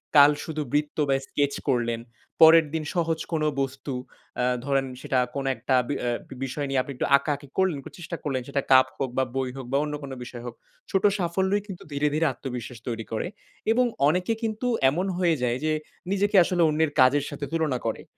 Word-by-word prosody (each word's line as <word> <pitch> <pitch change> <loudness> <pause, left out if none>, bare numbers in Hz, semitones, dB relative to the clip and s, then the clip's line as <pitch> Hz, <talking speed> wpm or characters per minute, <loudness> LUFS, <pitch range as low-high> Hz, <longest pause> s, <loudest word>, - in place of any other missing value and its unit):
কাল 145 0 +9
শুধু 155 -2 -4
বৃত্ত 150 0 0
বা 135 - +4
স্কেচ 145 -1 0 0.2
করলেন, 120 -3 +1 0.4
পরের 160 0 +9
দিন 160 -1 -1
সহজ 165 -2 0
কোনো 155 -1 +1
বস্তু 135 +1 -4 0.4
অ্যা 125 - +1 0.2
ধরেন 135 -1 +1 0.2
সেটা 130 - +1 0.2
কোনো 135 -1 -2
একটা 130 - 0
বি 145 - -1
অ্যা 120 - 0 0.3
বিষয় 140 +2 -3
নিয়ে 135 -1 +2
আপনি 140 - -7
একটু - - -1
আঁকাআঁকি 145 0 -3
করলেন, 190 -5 +2 0.2
চেষ্টা 170 0 -5
করলেন 135 -4 -1
সেটা 140 0 -1
কাপ 130 0 +7
হোক 135 - -1
বা 130 - +4
বই 130 -1 0
হোক 135 - -6
বা 135 - +3
অন্য 150 -1 -4
কোনো 135 -1 -6
বিষয় 120 -1 -9
হোক। - - -6 0.4
ছোট 195 -2 +1 0.2
সাফল্যই 190 +3 +1
কিন্তু 190 -4 -8
ধীরে, 145 +1 +1
ধীরে 155 +2 +2
আত্মবিশ্বাস 125 -2 -6
তৈরি 115 -2 -3
করে 110 - -2 0.4
এবং 250 +2 +4 0.2
অনেকে 180 +8 +1
কিন্তু 220 +2 -2 0.2
এমন 170 +7 -1
হয়ে 175 -3 +3
যায় 120 0 +1
যে, 155 - +2 0.4
নিজেকে 200 +1 +1
আসলে 175 0 0
অন্যের 155 0 +1
কাজের 135 +3 +4
সাথে 145 - -5
তুলনা 160 -6 0
করে। 110 - -3
145 Hz, 195 wpm, -26 LUFS, 130-165 Hz, 0.4 s, কাল